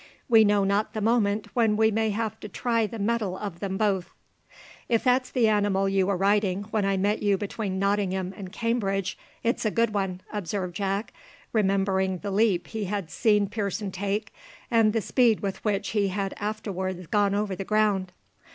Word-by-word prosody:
We 225 -3 +7
know 205 -1 +3
not 200 +2 0
the 215 - -2
moment 215 -1 +1
when 225 -3 +2
we 220 0 +4
may 220 +1 +1
have 215 0 -2
to 210 - -8
try 230 +1 0
the 225 - -7
metal 210 -3 -1
of 195 -5 -6
them 190 -1 -3
both." 195 -4 0 0.8
"If 230 -2 +2
that's 255 0 +2
the 240 -3 +2
animal 205 -2 +2
you 195 -1 +2
were 200 -2 +1
riding 200 0 +2
when 210 -2 +1
I 195 0 +1
met 205 +3 +1
you 205 -2 +2
between 200 -1 -3
Nottingham 190 -1 0
and 185 -3 -8
Cambridge, 195 -5 -1 0.3
it's 235 - 0
a 215 - +2
good 230 0 +1
one," 190 -3 -2
observed 190 -3 -3
Jack, 200 +2 -2 0.4
remembering 195 -3 +1
the 200 +3 -5
leap 195 -3 +2
he 220 -2 -4
had 195 -4 -3
seen 210 -3 +3
Pearson 205 -1 -3
take, 200 +3 -3 0.4
and 225 -2 +4
the 225 0 0
speed 235 +1 +3
with 195 -1 -4
which 200 -1 0
he 205 -2 +1
had 195 0 -2
afterwards 190 -4 -4
gone 200 +2 +2
over 205 -2 -1
the 195 - -4
ground. 205 -3 +1
205 Hz, 185 wpm, -26 LUFS, 195-215 Hz, 0.8 s, We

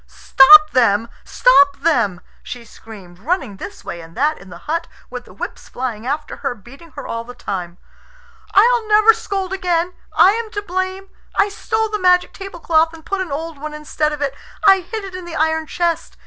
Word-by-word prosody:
"Stop 305 +3 +6
them! 230 -2 +2
Stop 375 -7 +4
them!" 235 - +1 0.2
she 245 -1 -9
screamed, 195 -6 -14
running 265 - -2
this 200 - -10
way 170 - -6
and 165 +3 -14
that 300 +4 +1
in 195 - -14
the 175 - -10
hut, 335 +2 -2 0.2
with - - -7
the - - -16
whips - - -8
flying 240 -2 -5
after 295 +3 -4
her 245 - -3
beating 275 - -16
her 285 - -8
all 230 0 -4
the 245 +1 -12
time. 180 -6 -6 0.8
"I'll 460 +2 +4
never 430 +1 +6
scold 385 -3 -4
again. 360 -2 -1 0.2
I 380 - +6
am 450 +1 -3
to 410 -1 -4
blame. 375 +1 -4 0.3
I 405 - +2
stole 445 +2 -2
the 425 0 -3
magic 360 -1 +3
tablecloth, 335 -4 0
and 320 0 -16
put 395 +1 -2
an 360 -5 -5
old 320 +1 -5
one 305 +1 -6
instead 300 0 -2
of 295 -1 -4
it. 275 -2 -2 0.3
I 390 -1 +7
hid 395 +3 -6
it 380 - -9
in 365 -1 -7
the 340 -1 -8
iron 320 0 0
chest." 345 -1 -2
320 Hz, 195 wpm, -18 LUFS, 250-375 Hz, 0.8 s, I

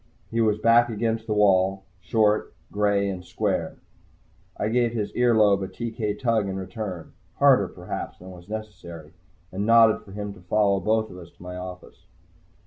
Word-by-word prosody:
He 115 0 +1
was 105 -2 +2
back 115 +2 +4
against 115 0 -2
the 105 - -1
wall, 95 -1 +3 0.2
short, 105 0 +1 0.2
gray 100 -1 +1
and 95 -2 -4
square. - - -2 0.8
I - - -1
gave 120 0 +1
his 105 -3 -2
ear 120 -1 +3
lobe 100 -2 +4
a 95 - -3
TK 110 -2 -4
tug 115 -4 +1
in 95 - -4
return, 95 -3 -6 0.2
harder, - - +5
perhaps, - - -7
than 95 +1 -12
was 90 +1 -14
necessary, 90 -7 -8 0.4
and 95 +2 -3
nodded 115 0 +5
for 95 - -14
him 105 0 -5
to 95 - -16
follow 100 +2 +2
both 110 +3 0
of 90 - -10
us 85 -2 -12
to - - -18
my 90 0 -7
office. 90 0 -10
105 Hz, 175 wpm, -25 LUFS, 95-110 Hz, 0.8 s, harder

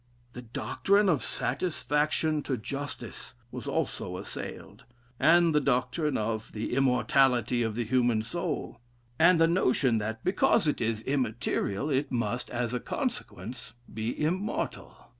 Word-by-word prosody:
The 125 - -7
doctrine 200 - +1
of 155 -8 +2
satisfaction 155 -2 0
to 130 - +1
justice, 140 +5 -6 0.2
was - - -7
also - - -2
assailed, - - -8 0.4
and 165 +3 +5
the 150 - +4
doctrine 130 +3 +1
of 110 0 -3
the 110 +2 -3
immortality 125 -2 +3
of 110 -2 -1
the 120 0 -1
human 120 -2 +2
soul, 120 +1 -4 0.4
and 170 +1 +6
the 165 - +6
notion 130 -8 +2
that 110 +2 -4
because 185 -3 +3
it 150 - 0
is 115 -1 -1
immaterial, 125 -1 -1
it 135 +1 0
must, 120 0 -1
as 120 -1 -2
a 125 - 0
consequence, 175 - -4 0.2
be 110 +2 -3
immortal.... 185 +7 -2
130 Hz, 135 wpm, -29 LUFS, 115-155 Hz, 0.4 s, and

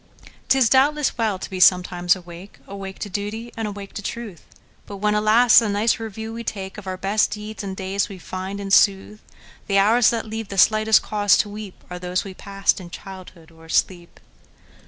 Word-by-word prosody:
'T 270 - +5
is, 255 -4 +4
doubtless, 280 +4 +2
well 220 -4 -1
to - - -7
be 185 - -6
sometimes 180 -1 +4
awake,—Awake 190 +2 -10
to - - -5
duty, 210 +4 -5
and 225 -2 -3
awake 200 -1 -8
to - - -6
truth,—But 205 -2 -10
when, 210 +1 0
alas! 215 +3 +5
a 225 - -1
nice 210 +3 +1
review 220 0 -6
we 230 +1 -6
takeOf 195 -1 -6
our 185 0 -4
best 195 +3 +1
deeds 210 +1 -7
and 190 -1 -6
days, 195 +2 -2
we 195 - -9
find, 185 +2 -6
in 200 -1 -6
sooth, 200 +2 +3 0.5
The 200 - +1
hours 220 +4 +5
that 230 -1 -2
leave 220 0 -6
the 195 - -7
slightest 215 +3 +4
cause 205 -2 +2
to 210 - 0
weepAre 200 -3 -9
those 180 0 -2
we 195 - -8
passed 195 +1 -1
in 175 - -10
childhood 180 -3 -11
or 165 0 -17
asleep! 175 +1 -2
200 Hz, 185 wpm, -22 LUFS, 190-220 Hz, 0.5 s, T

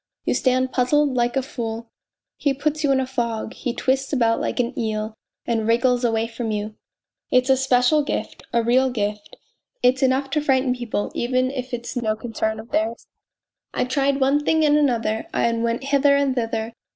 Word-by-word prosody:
You - - +1
stand 255 0 +1
puzzled 275 +2 +2
like 240 +1 +1
a 265 - +1
fool 230 -4 -5 0.4
he 280 -2 0
puts 305 +2 -1
you 285 - +3
in 270 - +3
a 260 - 0
fog, 235 -3 -3
he 245 - -3
twists 265 +2 0
about 230 -5 +2
like - - -2
an 245 +1 0
eel 215 -1 -2 0.3
and 225 -2 -1
wriggles 245 +2 +2
away 225 -1 +1
from 230 0 -5
you. 210 0 -3 0.6
It's 255 +1 +3
a - - +6
special 265 +3 +3
gift, 290 - -4
a 235 -1 +2
real 255 +3 +3
gift 210 -3 -3 0.5
it's"enough 265 +2 +2
to 300 - +1
frighten 260 -3 +2
people 240 -4 -3
even 255 +1 0
if 255 -1 -5
it 240 -1 -4
is - - -6
no 220 -3 0
concern 220 -1 -3
of 225 +2 -11
theirs. 225 +2 -1 0.7
I - - +1
tried 275 +2 +1
one 275 +2 +2
thing 315 +1 +3
and 295 0 +4
another, 235 -7 +1
and 230 0 +1
went 235 +2 -1
hither 280 +1 +3
and 280 -1 +2
thither. 225 -2 -2
250 Hz, 190 wpm, -22 LUFS, 230-270 Hz, 0.7 s, a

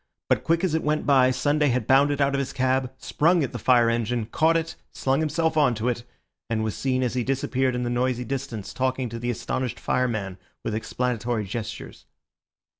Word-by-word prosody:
But - - +2
quick 165 +2 +1
as 185 -4 +1
it 160 - +1
went 150 +1 0
by, 130 -3 +5
Sunday 145 +4 +1
had 125 -3 0
bounded 140 +3 +4
out 140 0 +2
of 140 - +1
his 135 - -3
cab, 130 0 +1
sprung 165 +4 +2
at 135 - -3
the - - -5
fire 120 -2 +4
engine, 115 0 0
caught 160 +8 +2
it, 165 0 -3 0.2
slung 135 +1 0
himself 160 +1 0
on 140 -5 +4
to 110 +3 -1
it, 120 -1 -3 0.4
and 110 -1 0
was 110 - -1
seen 130 -1 0
as 125 - -1
he 125 -1 0
disappeared 130 0 0
in 125 - -1
the 120 - -1
noisy 125 0 0
distance 130 -6 -5
talking 130 -1 -1
to 115 +1 -6
the 120 +1 -3
astonished 125 +1 -3
fireman 110 -7 -1 0.2
with 110 - -2
explanatory 120 0 -2
gestures. 105 +3 -7
130 Hz, 200 wpm, -25 LUFS, 120-140 Hz, 0.4 s, by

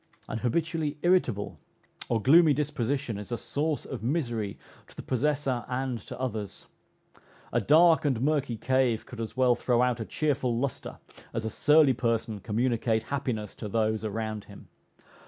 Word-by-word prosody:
An 115 - -4
habitually 155 +3 -1
irritable 175 - +1 0.5
or 115 - +2
gloomy 150 +5 +6
disposition 140 -5 -2
is 105 - -9
a 120 - -1
source 150 +4 -2
of 130 - -6
misery 120 -6 -2 0.3
to - - -18
the - - -8
possessor 135 -1 0
and 125 -1 -2
to - - -8
others. 110 -6 -4 0.9
A - - +2
dark 165 +2 +5
and 135 -6 +1
murky 140 -3 0
cave 130 -2 +1
could 120 -2 -8
as 115 +3 -6
well 130 -1 +5
throw 120 0 +1
out 125 -1 +1
a 110 - -3
cheerful 135 -5 0
lustre, 135 +1 -3 0.4
as 115 -1 -2
a 110 - -2
surly 150 -2 +5
person 115 -3 -1
communicate 115 +1 0
happiness 120 -7 -3
to 105 - -6
those 110 0 0
around 110 0 -3
him. - - -14
125 Hz, 155 wpm, -28 LUFS, 115-145 Hz, 0.9 s, gloomy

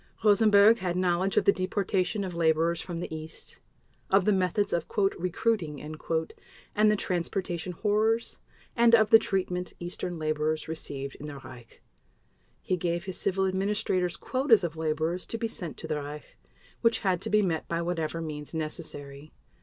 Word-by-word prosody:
Rosenberg 215 +1 +6
had 180 -2 -2
knowledge 185 +1 +1
of - - +4
the - - +7
deportation 190 +1 -1
of 185 -2 -4
laborers 165 0 +2
from 175 -2 -5
the 160 - -5
East, 155 0 -9 0.5
of 195 -1 +4
the 210 - +4
methods 195 +2 +1
of 170 -2 -1
"recruiting" 185 -4 0
and 160 +7 -2
the - - +3
transportation 180 -2 -2
horrors, 220 +4 0 0.4
and 235 -1 +6
of 220 -2 +3
the 225 - +10
treatment 180 -3 -2
Eastern 175 0 -5
laborers 155 0 -1
received 140 -4 -5
in 150 - -8
the 145 -1 -7
Reich. 125 -3 -13 0.8
He 185 - 0
gave 170 +1 -2
his 190 -2 -4
civil 190 +1 +1
administrators 190 -2 0
quotas 255 -6 +3
of 165 -2 -2
laborers 160 +2 -1
to 230 - -3
be 230 - -1
sent 175 -7 -6
to - - -7
the 150 - -1
Reich, 150 +1 -8 0.5
which 230 -1 +3
had 185 -4 +1
to - - -1
be 210 0 +4
met 165 -4 -1
by 170 0 -1
whatever 165 -1 -2
means 150 -1 -6
necessary. 155 -2 -6
180 Hz, 160 wpm, -28 LUFS, 160-200 Hz, 0.8 s, the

